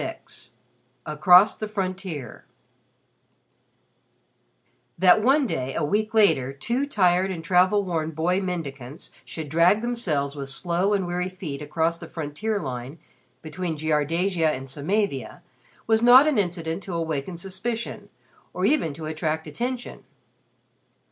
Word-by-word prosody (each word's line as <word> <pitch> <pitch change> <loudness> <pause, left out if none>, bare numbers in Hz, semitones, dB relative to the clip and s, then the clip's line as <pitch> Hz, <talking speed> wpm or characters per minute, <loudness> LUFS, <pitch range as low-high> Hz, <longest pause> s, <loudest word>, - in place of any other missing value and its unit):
XXVI - - -8 0.6
ACROSS 180 +6 +5
THE 215 - -4
FRONTIER 185 - -5 2.5
That 185 +4 +5
one 270 +5 +3
day, 130 - -3
a - - -1
week 215 +7 -1
later, 135 -12 +4
two 235 - -2
tired 185 -6 +2
and 170 -4 -5
travel 185 +3 +3
worn 165 -4 -2
boy 170 +4 0
mendicants 145 -7 -6
should 160 -2 -7
drag 170 +8 +3
themselves 165 -13 -1
with 140 -1 -5
slow 175 +7 0
and 195 -2 -1
weary 180 +1 -2
feet 160 -7 -7
across 160 +3 -1
the - - -9
frontier 165 +8 -3
line 130 0 -6 0.5
between 160 +1 -4
Jiardasia 160 +3 +1
and 135 -3 -3
Samavia, 140 - -2 0.4
was 220 0 +2
not 245 +4 +8
an 300 -7 +2
incident 170 -2 -2
to 185 -4 -6
awaken 165 +1 -3
suspicion 195 +6 -4 0.5
or - - 0
even 270 - +2
to 160 - -7
attract 155 0 -2
attention. 245 - -5
175 Hz, 130 wpm, -24 LUFS, 150-200 Hz, 2.5 s, not